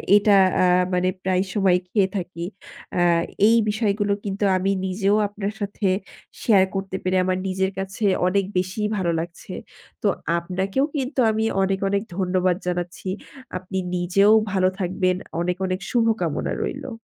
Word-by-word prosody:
এটা 205 0 +5 0.3
আ - - +5 0.3
মানে 180 0 +2
প্রায়ই 185 0 +1
সময় 190 -3 +3
খেয়ে 195 0 +2
থাকি। 175 -2 -5 0.5
আ - - +3 0.5
এই 230 - +5
বিষয়গুলো 205 -1 +1
কিন্তু 200 +1 -3
আমি 195 +2 0
নিজেও 195 +2 +1
আপনার 205 0 -4
সাথে 200 0 -2 0.5
share 195 -4 +4
করতে 195 0 -3
পেরে 185 0 +1
আমার 185 0 0
নিজের 190 +1 0
কাছে 195 +3 -3 0.2
অনেক 195 +1 +1
বেশিই 185 +4 -1
ভালো 175 -3 0
লাগছে। 170 +1 -7 0.5
তো - - +3 0.3
আপনাকেও 190 +9 -1
কিন্তু 270 -1 -2
আমি 220 0 -1 0.2
অনেক, 190 0 0
অনেক 200 +1 0
ধন্যবাদ 185 -1 +1
জানাচ্ছি। 180 +1 -3 0.5
আপনি 185 +1 -6 0.2
নিজেও 190 +4 +3 0.2
ভালো 190 -1 +3
থাকবেন। 185 0 0 0.3
অনেক, 180 +1 -1
অনেক 185 0 -2
শুভকামনা 225 -8 +1 0.3
রইল। 255 - -4
190 Hz, 145 wpm, -23 LUFS, 185-205 Hz, 0.5 s, এটা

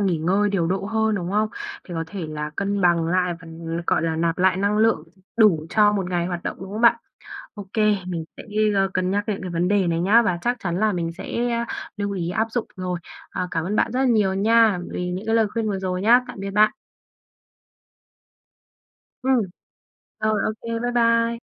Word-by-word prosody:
nghỉ 185 -5 +1
ngơi 195 +6 +2
điều 185 -4 +1
độ 190 +3 -1
hơn, 220 +1 +1
đúng 180 -3 -3
không? 215 +2 +1 0.4
Để 175 - -6
có 165 0 -2
thể 175 -1 -6
là 150 0 -4
cân 200 0 -1
bằng 170 -3 +3
lại 180 0 +1
và, 165 - -12 0.4
gọi - - +2
là, 165 -1 -1
nạp 165 0 0
lại 185 0 +3
năng 200 +2 +1
lượng, 225 +1 +3 0.3
đủ 185 -9 +4
cho 210 -1 +4
một 190 -3 -2
ngày 175 -1 0
hoạt 175 -1 -4
động, - - -4
đúng 190 - -8
không 215 - -3
bạn? 235 0 +6 0.6
Ô 205 -3 -8
kê, 215 -1 +3
mình 170 -3 -3
sẽ, - - -8 0.3
a, 195 0 +3
cân 185 0 0
nhắc 205 +1 0
đến 210 -2 -2
cái 185 - -5
vấn 170 +1 0
đề 200 -2 +2
này 165 -1 0
nhá, 210 +7 +5
và 180 -6 0
chắc 245 +1 +1
chắn 175 -1 -2
là 215 -1 +3
mình 170 -2 -2
sẽ - - -9 0.7
lưu 205 -1 -2
ý 175 -3 -2
áp 220 +5 0
dụng 235 0 -2
rồi. 180 -1 -3 0.3
Ờ, 180 0 -3
cảm 165 -2 -1
ơn 200 +4 -2
bạn - - +1
rất 255 - 0
là 270 - +3
nhiều 210 -6 +3
nha 220 0 +4
vì 180 0 -3
những 185 +4 -5
cái 225 - +1
lời 225 -1 +4
khuyên 225 0 -2
vừa 200 -2 -1
rồi 185 -1 -2
nhá. 235 +4 +6
Tạm - - -8
biệt 195 0 -4
bạn! 210 +2 +4 2.5
Ừm. 260 -1 +3 0.8
Rồi, 215 0 +1
ô - - 0
kê, 230 0 -3
bye 245 +1 -1
bye! 230 -1 +2
195 Hz, 220 wpm, -23 LUFS, 180-220 Hz, 2.5 s, bạn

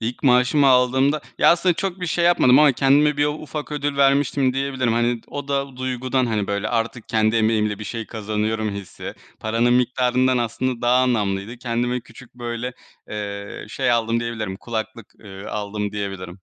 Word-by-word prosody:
İlk 115 +2 -4
maaşımı 125 +2 +4
aldığımda, 130 +3 +3 0.2
ya - - +6
aslında 175 +1 +3
çok 190 +1 -3
bir 180 - -2
şey 170 +2 0
yapmadım 145 -7 +5
ama 150 -2 +6
kendime 140 +3 +3
bir 145 - +2
u 150 - +1
ufak 150 0 -6
ödül 145 -1 -2
vermiştim 140 -1 +3
diyebilirim. 135 -3 0
Hani, 120 0 +1
o 145 -1 -7
da 140 -2 -2
duygudan, 130 0 -1
hani, 105 -3 -1
böyle, 100 +1 -2
artık 115 0 -2
kendi 110 0 +2
emeğimle 110 -2 +1
bir 105 - -7
şey 115 -1 -5
kazanıyorum 110 0 -2
hissi, 100 -2 -7 0.3
paranın 115 +2 +1
miktarından 125 +1 +2
aslında 120 +1 -2
daha 120 +1 +4
anlamlıydı. 105 -2 -1
Kendime 120 +1 -1
küçük 115 +1 -16
böyle, 120 0 -4 0.4
eee, 100 -1 -6
şey 125 +2 0
aldım 115 0 +1
diyebilirim 110 -5 -4
kulaklık, 110 0 -6
eee, 95 -2 -10
aldım 105 0 -4
diyebilirim. 95 -3 -5
120 Hz, 170 wpm, -22 LUFS, 110-135 Hz, 0.4 s, ya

